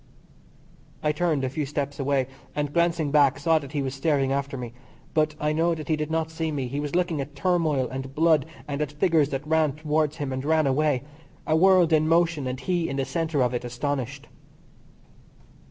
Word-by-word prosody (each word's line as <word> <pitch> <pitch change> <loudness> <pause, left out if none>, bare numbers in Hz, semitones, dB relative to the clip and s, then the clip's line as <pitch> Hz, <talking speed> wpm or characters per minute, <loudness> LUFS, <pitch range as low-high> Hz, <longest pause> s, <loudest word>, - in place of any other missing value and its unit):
I 150 - +3
turned 150 -3 0
a 130 - 0
few 145 +2 -3
steps 145 0 -3
away, 135 -1 +1 0.3
and 145 -1 -2
glancing 170 -3 +1
back 140 -2 +4
saw 160 +2 +3
that 140 -1 -10
he 145 -2 -1
was 130 -1 -3
staring 135 -1 +1
after 140 0 -2
me, 120 -2 -6 0.4
but 155 -1 +1
I 150 0 0
know 165 +2 +2
that 155 0 -8
he 155 - +3
did 155 0 -3
not 160 0 -1
see 160 0 -2
me 135 -4 -2
he 140 +4 -3
was 145 +2 -3
looking 175 -4 +1
at 140 +1 -8
turmoil, 155 -6 +1
and 135 +1 -6
blood, 160 -2 +3 0.2
and 145 0 -3
at 150 -1 -2
figures 155 -2 +2
that 135 0 -4
ran 155 -2 +2
towards 155 0 0
him 140 -4 -3
and 130 0 -3
ran 155 +1 +2
away 140 -1 +1 0.4
a 155 - +2
world 180 -1 +5
in 155 0 +3
motion 165 -4 +2
and 130 0 -3
he 175 -3 0
in 135 - -3
the 135 - 0
centre 155 0 0
of 125 0 0
it 120 - -2
astonished. 135 +2 -3
150 Hz, 205 wpm, -25 LUFS, 135-160 Hz, 0.4 s, world